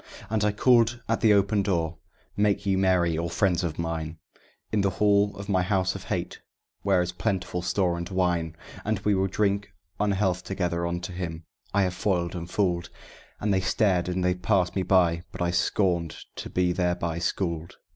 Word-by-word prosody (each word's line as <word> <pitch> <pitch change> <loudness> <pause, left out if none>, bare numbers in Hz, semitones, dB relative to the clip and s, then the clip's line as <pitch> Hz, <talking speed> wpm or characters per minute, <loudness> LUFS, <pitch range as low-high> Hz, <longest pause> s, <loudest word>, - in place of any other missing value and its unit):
And 110 -1 +1
I 105 - +3
called 120 +2 +3
at 115 - 0
the 110 -2 +5
open 100 +1 +2
door, 85 -4 -1 0.4
"Make 105 0 +1
ye 100 -1 +2
merry, 90 -4 +2
all 85 0 -2
friends 90 -1 +1
of 80 -3 -3
mine, 80 -1 -3 0.5
In 105 - +2
the 100 - +2
hall 100 +1 +2
of 100 0 -7
my 95 -3 +2
House 95 -1 +1
of 95 -1 -8
Hate, 90 -2 -3 0.4
where 95 -3 +3
is 90 - -3
plentiful 90 -1 -2
store 90 -1 0
and 85 0 -5
wine. 90 -4 0 0.5
We 105 - +3
will 95 0 +2
drink 100 +1 0 0.3
unhealth 95 -3 +1
together 85 -2 -1
unto 85 +2 -4
him 85 -2 -5 0.3
I 100 0 +3
have 90 -1 0
foiled 90 -2 0
and 85 0 -5
fooled!" 85 -4 0 0.5
And 105 -1 +1
they 95 - +2
stared 90 -1 +1
and 90 0 -1
they 90 0 +3
passed 90 -1 +1
me 95 - +1
by; 90 -3 +3
but - - -9
I 85 0 +1
scorned 85 -2 +1 0.2
to - - -5
be 90 -1 +1
thereby 90 -2 -1
schooled. 85 -1 -2
90 Hz, 185 wpm, -26 LUFS, 85-100 Hz, 0.5 s, the